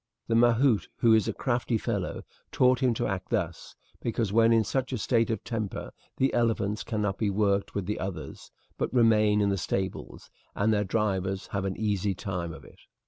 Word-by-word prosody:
The 115 - +1
mahout, 120 0 +4
who 115 -1 +6
is 110 -2 +3
a - - +1
crafty 120 -2 -1
fellow, 105 -5 -3 0.3
taught 125 0 +3
him 125 -3 +2
to - - -1
act 95 -2 -3
thus, 90 -8 -3 0.3
because 115 -3 -1
when 115 +1 +5
in 115 -1 +4
such 130 +3 -2
a 130 - -1
state 115 +1 +1
of 110 - -2
temper 110 -4 -4 0.3
the 135 - +2
elephants 110 -3 0
cannot 105 -3 -2
be 105 - +1
worked 100 0 0
with 100 -2 -2
the 105 +3 -3
others, 90 -7 -6 0.3
but - - -1
remain 110 -4 +4
in 100 - +2
the 100 -1 0
stables, 95 +2 -4 0.2
and 110 +2 +2
their 105 -1 +2
drivers 95 -2 -1
have 100 -1 -2
an 95 -1 -3
easy 105 -2 0
time 90 -4 -4
of 80 - -11
it. - - -17
105 Hz, 195 wpm, -28 LUFS, 100-115 Hz, 0.3 s, who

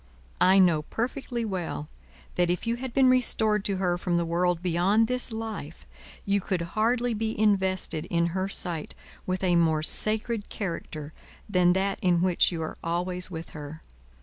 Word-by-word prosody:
I 190 +1 +6
know 175 -5 +4
perfectly 240 - -3
well 180 -7 -4 0.5
that 175 -1 +1
if 175 +5 -1
you 230 +1 -1
had 260 0 -5
been 265 +1 +4
restored 220 -5 +3
to 200 -2 0
her 180 -2 0
from 175 -1 0
the 170 - 0
world 175 +1 0
beyond 185 +6 +3
this 250 +1 -1
life, 220 -9 -6 0.4
you 200 0 +1
could 185 -2 -2
hardly 240 +2 +1
be 220 0 -3
invested, 190 -6 +1
in 170 0 +1
her 190 +1 -1
sight, 170 -5 -2 0.3
with 185 0 -2
a 180 -2 +3
more 160 -2 +2
sacred 215 +4 +1
character 160 -5 -5 0.3
than 180 -3 +3
that 195 +1 0
in 175 -1 +2
which 185 -1 +3
you 165 -2 -3
are 160 - -6
always 180 +2 -2
with 165 -2 -7
her. 150 +1 -9
185 Hz, 170 wpm, -27 LUFS, 170-215 Hz, 0.5 s, I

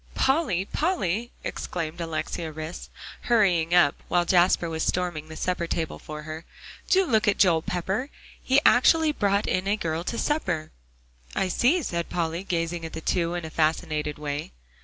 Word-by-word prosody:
"Polly, 265 - +1
Polly," 240 - -1
exclaimed 165 -1 -4
Alexia 165 0 -3
Rhys, 155 +2 -7 0.4
hurrying 180 -7 +3
up, 175 -5 +6
while 175 -1 +2
Jasper 175 -1 +3
was 160 -1 -3
storming 175 -4 -1
the 160 - -8
supper 175 +1 -1
table 165 -1 -3
for 150 0 -8
her, 155 +1 -7 0.5
"do 380 0 +4
look 220 -8 +2
at 200 - +3
Joel 170 -5 +4
Pepper! 190 - -2 0.3
He 265 +2 +4
actually 315 +5 +5
brought 200 -6 +1
in 185 +1 -1
a 205 +2 +2
girl 165 -3 -2
to 235 - -3
supper!" 180 - -1 0.6
"I 190 - 0
see," 295 - +2
said 170 -7 -3
Polly, 170 +1 -2
gazing 170 -2 -2
at 160 - -6
the 160 - -5
two 170 0 0
in 175 -2 -4
a 160 - -7
fascinated 155 -1 0
way. 145 - -4
175 Hz, 165 wpm, -26 LUFS, 160-205 Hz, 0.6 s, up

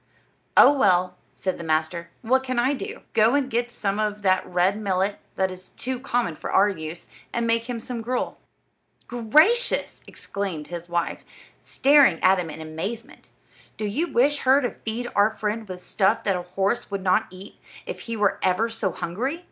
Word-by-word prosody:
"Oh, 285 - +9
well," 185 -8 +2 0.2
said 185 - -3
the - - -6
master, 160 +2 -1
"what 260 +3 +2
can 255 -1 -3
I 255 +4 +3
do? 270 - -6
Go 225 +4 +4
and 275 -2 0
get 240 +1 0
some 205 -4 -2
of 210 -1 -2
that 185 -1 +3
red 180 +2 +2
millet, 195 0 0 0.2
that 190 -1 0
is 185 0 -10
too 255 0 -4
common 245 -9 -1
for - - -6
our 205 +2 +5
use, 165 -3 -6 0.3
and 235 0 -1
make 230 +1 0
him 240 -2 -3
some 235 0 -5
gruel." 250 +2 -3 0.7
"Gracious!" 305 - +2
exclaimed 190 -7 -5
his 175 0 -7
wife, 170 -1 -2 0.4
staring 275 - +4
at 185 0 +5
him 170 -2 -3
in 160 - -8
amazement; 175 +9 -6 0.5
"do 215 - -3
you 295 +12 -1
wish 285 +4 +3
her 265 +2 +4
to 245 - -1
feed 230 +2 -5
our 205 +1 +5
friend 220 0 -4
with 180 -1 -6
stuff 190 -2 +1
that 195 - +1
a 180 - -2
horse 195 +5 -1
would 200 -2 -4
not 185 -1 +2
eat 185 +2 -13 0.3
if - - -6
he 230 - -2
were 205 -2 +1
ever 190 +5 +1
so 225 -4 -2
hungry? 240 - -3
210 Hz, 185 wpm, -24 LUFS, 185-245 Hz, 0.7 s, Oh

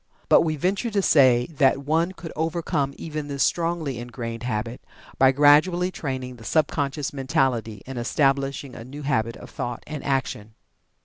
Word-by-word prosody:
But - - +7
we 155 -1 0
venture 195 - -1
to 205 -2 +1
say 130 -7 +5
that 140 -2 +2
one 165 +4 +1
could 170 -2 -9
overcome 160 -3 -1
even 155 -2 -5
this 140 -1 0
strongly 165 -7 -1
ingrained 120 -1 -6
habit, 115 0 -3 0.4
by 130 0 +6
gradually 155 +6 +4
training 130 -6 -5
the 115 - -13
sub 155 +6 +2
conscious 140 -1 -2
mentality 130 -7 -1
and 130 -1 -6
establishing 135 +1 0
a 115 - -8
new 140 +5 -9
habit 115 -4 0
of - - -12
thought 120 -1 -5
and 150 -1 -6
action. 120 -6 -2
140 Hz, 165 wpm, -24 LUFS, 125-155 Hz, 0.4 s, But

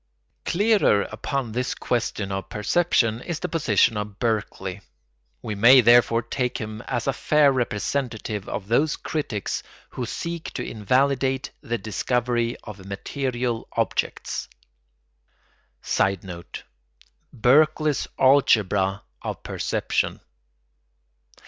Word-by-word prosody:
Clearer 200 - +3
upon 120 +2 -3
this 125 +3 -2
question 110 -5 -2
of 95 0 -4
perception 115 -1 +1
is 170 +2 -4
the 180 - -2
position 115 - +2
of 105 -1 -5
Berkeley; 105 -4 -2 0.6
we 105 - -3
may 120 +6 +7
therefore 120 -1 +5
take 125 +1 -2
him 110 0 -6
as 120 -3 -2
a 135 - +1
fair 150 0 +4
representative 115 -3 -2
of 100 - -4
those 145 +7 +2
critics 120 - -3 0.3
who 125 -2 -4
seek 170 +6 -4
to - - -3
invalidate 130 +4 +1
the 120 0 -2
discovery 120 +2 -1
of 105 -3 -10
material 120 +3 -3
objects. - - -2 1.4
[Sidenote: 95 -3 -2 0.7
Berkeley's 150 +4 +3
algebra 105 -8 +3 0.2
of - - -5
perception. - - -1
120 Hz, 105 wpm, -24 LUFS, 105-135 Hz, 1.4 s, may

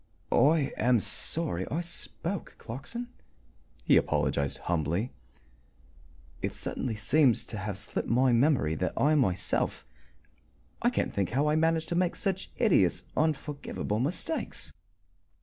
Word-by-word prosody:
"I 150 -1 +4
am 120 +1 +3
sorry 140 - 0
I 165 - -1
spoke, 175 +1 -5
Clarkson," 185 - -6 0.7
he - - +5
apologized 70 -1 +1
humbly. 85 - 0 1.3
"It - - -2
certainly 115 -4 -3
seemed 125 +4 +4
to - - -6
have 105 -2 -4
slipped 105 +2 -4
my 125 +2 +4
memory 120 - +3
that 90 +4 -1
I 150 +3 +4
myself 95 - 0 1.0
I - - +4
can't - - -1
think 95 -3 0
how 140 +7 +1
I 150 - +2
managed 160 0 +1
to 170 - -1
make 180 0 +1
such 190 -2 -2
hideous, 175 - +3
unforgivable 150 -8 -1
mistakes." 170 - -3
135 Hz, 125 wpm, -29 LUFS, 105-160 Hz, 1.3 s, he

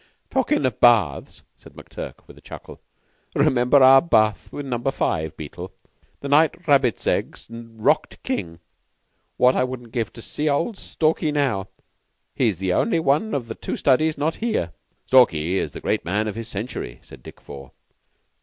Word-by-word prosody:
"Talkin' 260 - +1
of 125 -4 -2
baths," 110 - +2 0.2
said - - -16
McTurk, - - -10
with - - -15
a - - -18
chuckle, - - -11 0.5
"'member 135 -1 +4
our 135 +1 +8
bath 110 - +1
in 145 -1 -6
Number 125 0 -1
Five, 80 - -2
Beetle, 75 -2 -8 0.5
the 140 - -5
night 160 +4 +2
Rabbits 135 -5 +2
Eggs - - -2
rocked 115 -1 -2
King? 85 -1 -4 0.8
What 125 +1 +5 0.2
wouldn't 125 -2 -8
I - - -26
give 115 -3 -2
to 115 - -11
see 150 +1 -2
old 165 +10 0
Stalky 155 -1 -1
now! 135 -10 0 0.7
He 125 - +1
is 100 -6 -1
the 95 0 -1
only 170 - +1
one 160 +8 +1
of 130 -4 -2
the 115 - -5
two - - -5
Studies 155 +4 +2
not 155 +3 -1
here." 220 - -2 0.3
"Stalky 95 -8 +3
is - - -4
the - - -8
great - - -1
man 105 +5 -1
of 105 - -3
his 115 +1 -7
Century," 105 - -6
said - - -15
Dick - - -13
Four. 70 -2 -11
125 Hz, 170 wpm, -22 LUFS, 105-145 Hz, 0.8 s, our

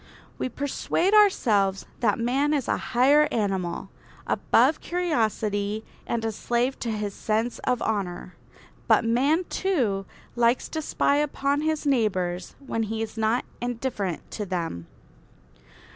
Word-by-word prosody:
We - - -1
persuade 285 - -1
ourselves 215 - +4
that 215 -5 +2
man 270 +6 +1
is 275 -5 -1
a - - +1 0.2
higher 290 +4 +6
animal, 195 -6 -2 0.3
above 270 +7 +3
curiosity 220 - -1 0.2
and 230 -1 -1
a 225 - 0
slave 240 +4 -1
to 235 - -3
his 210 -2 -2
sense 220 +4 -1
of 250 -1 +1
honour. 185 -4 -2 0.5
But - - +4
man, 275 +9 +2
too, 235 - 0 0.3
likes 240 +1 +2
to 315 - -3
spy 285 -1 +1
upon 285 -1 0
his 310 -1 -1
neighbours 185 -9 0
when 225 -4 -2
he 225 0 -2
is 220 - -7
not 225 +2 +1 0.2
indifferent 235 -7 -3
to 210 - -4
them. 165 - -3
230 Hz, 130 wpm, -26 LUFS, 205-280 Hz, 0.5 s, higher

